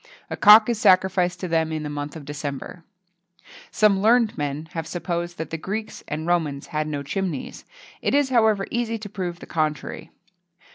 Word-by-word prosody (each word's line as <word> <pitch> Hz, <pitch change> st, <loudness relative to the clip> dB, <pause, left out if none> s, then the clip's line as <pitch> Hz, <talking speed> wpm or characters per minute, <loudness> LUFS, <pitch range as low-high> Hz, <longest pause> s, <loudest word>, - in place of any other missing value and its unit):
A -, -, -1 dB
cock 215 Hz, +1 st, +8 dB
is 235 Hz, -3 st, -1 dB
sacrificed 185 Hz, -2 st, +3 dB
to 185 Hz, -, -2 dB
them 160 Hz, -1 st, 0 dB
in 155 Hz, -1 st, -3 dB
the -, -, -4 dB
month 145 Hz, 0 st, -5 dB
of 155 Hz, -3 st, -9 dB
December.[XXII 145 Hz, +3 st, -6 dB, 0.7 s
55] -, -, -17 dB
Some 205 Hz, -3 st, +3 dB
learned 230 Hz, +1 st, +4 dB
men 145 Hz, +1 st, -3 dB
have 165 Hz, -1 st, -4 dB
supposed 175 Hz, -1 st, -4 dB
that 160 Hz, -, -5 dB
the 165 Hz, -, -4 dB
Greeks 215 Hz, +6 st, -5 dB
and 155 Hz, +2 st, -4 dB
Romans 160 Hz, -5 st, 0 dB
had 155 Hz, 0 st, -1 dB
no 145 Hz, -2 st, -3 dB
chimneys; 170 Hz, -1 st, -4 dB, 0.4 s
it -, -, +1 dB
is, 285 Hz, -2 st, +3 dB
however, 220 Hz, -5 st, +3 dB
easy 235 Hz, -1 st, -1 dB
to 215 Hz, -1 st, -8 dB
prove 180 Hz, -4 st, -4 dB
the -, -, -8 dB
contrary. 155 Hz, -3 st, -3 dB
175 Hz, 185 wpm, -23 LUFS, 155-210 Hz, 0.7 s, cock